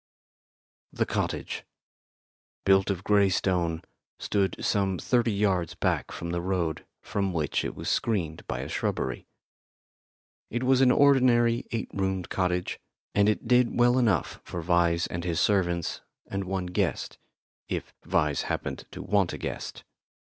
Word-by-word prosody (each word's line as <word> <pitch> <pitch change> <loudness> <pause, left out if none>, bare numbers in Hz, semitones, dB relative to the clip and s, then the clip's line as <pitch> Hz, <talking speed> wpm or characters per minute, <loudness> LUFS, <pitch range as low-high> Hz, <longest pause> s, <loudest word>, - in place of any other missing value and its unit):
The - - 0
cottage, - - -2 1.0
built 95 0 +4
of 95 -1 -2
grey 100 -1 +4
stone, 85 -3 0 0.3
stood 100 -2 0
some 95 -2 +1
thirty 120 +1 +1
yards 95 -5 0
back - - 0
from 85 - -5
the 85 0 -1
road, 85 -4 -2 0.2
from 100 -3 -1
which 75 -3 0
it - - -4
was - - -6
screened 85 -8 -1
by - - -3
a - - -5
shrubbery. 65 -1 -2 1.2
It 120 +2 -2
was 130 0 +4
an 130 - +6
ordinary 125 -3 +4
eight 115 - -3
roomed 95 -2 -1
cottage, 90 -1 -1 0.3
and 100 +1 +4
it 105 - -1
did 125 -1 +3
well 120 +1 +5
enough 110 -9 +1
for 85 -1 -5
Vyse 85 -1 +2
and 85 0 -3
his 85 -2 -1
servants 85 -5 +1 0.2
and 100 0 -3
one 95 0 -2
guest 90 0 -2 0.5
if - - -4
Vyse 75 -5 +1
happened - - -3
to - - -8
want 100 -4 +1
a - - -4
guest. - - -5
95 Hz, 145 wpm, -27 LUFS, 85-110 Hz, 1.2 s, an